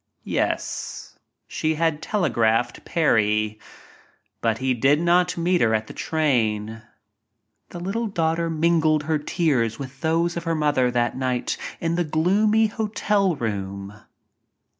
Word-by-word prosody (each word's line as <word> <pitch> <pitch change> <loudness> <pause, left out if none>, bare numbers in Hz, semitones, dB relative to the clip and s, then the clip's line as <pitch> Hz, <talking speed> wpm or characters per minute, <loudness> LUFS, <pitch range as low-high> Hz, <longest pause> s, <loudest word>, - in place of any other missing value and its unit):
Yes, - - -3 0.3
she 160 0 -1
had 160 -1 0
telegraphed 120 - 0
Parry 110 -8 +1 0.4
— - - -35
but 115 -1 +1
he 130 +1 0
did 135 +5 +3
not 175 +1 +2
meet 175 +1 +1
her 110 -1 +3
at 110 0 -1
the - - -10
train. 115 -8 0 0.9
The 175 - -8
little 205 +6 -2
daughter 165 -3 0
mingled 160 -1 +2
her 155 -1 0
tears 140 -7 0
with 135 -1 -9
those 170 +1 +1
of 170 0 -5
her 165 0 0
mother 145 -5 +2
that 120 -1 0
night 130 -2 -1 0.2
in 170 0 -1
the 175 - +2
gloomy 200 +8 +2
hotel 210 -3 0
room. 100 -4 -4
155 Hz, 135 wpm, -23 LUFS, 120-170 Hz, 0.9 s, did